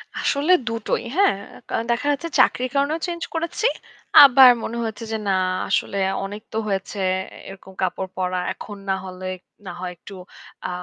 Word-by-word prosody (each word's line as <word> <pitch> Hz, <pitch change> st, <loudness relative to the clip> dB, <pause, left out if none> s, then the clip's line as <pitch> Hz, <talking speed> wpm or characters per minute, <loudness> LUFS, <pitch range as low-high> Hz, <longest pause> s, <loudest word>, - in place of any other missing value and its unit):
আসলে 290 Hz, +5 st, +1 dB, 0.2 s
দুটোই। 225 Hz, -1 st, -2 dB
হ্যাঁ? 400 Hz, -, +4 dB, 0.3 s
কারন 225 Hz, -, -1 dB
দেখা 245 Hz, +5 st, -1 dB
যাচ্ছে 290 Hz, +4 st, -2 dB
চাকরির 255 Hz, 0 st, +3 dB
কারণেও 285 Hz, +4 st, +1 dB
চেঞ্জ 340 Hz, -1 st, -5 dB
করেছি। 335 Hz, +7 st, 0 dB, 0.6 s
আবার 265 Hz, -1 st, +9 dB
মনে 235 Hz, -, -4 dB
হয়েছে 220 Hz, -1 st, -5 dB
যে 220 Hz, -, 0 dB
না -, -, +2 dB, 0.4 s
আসলে 200 Hz, -, 0 dB, 0.3 s
অনেক 205 Hz, +2 st, -7 dB
তো -, -, -2 dB
হয়েছে 195 Hz, +1 st, -3 dB, 0.4 s
এ -, -, -13 dB
এরকম 190 Hz, 0 st, -12 dB
কাপড় 185 Hz, +1 st, -2 dB
পরা। 185 Hz, 0 st, -1 dB
এখন 205 Hz, -1 st, -9 dB
না 190 Hz, -, +2 dB
হলে 185 Hz, 0 st, -8 dB, 0.4 s
না 185 Hz, -, -5 dB
হয় 180 Hz, 0 st, -4 dB
একটু 200 Hz, -, -12 dB, 0.5 s
আ -, -, -2 dB
225 Hz, 165 wpm, -22 LUFS, 195-280 Hz, 0.6 s, আবার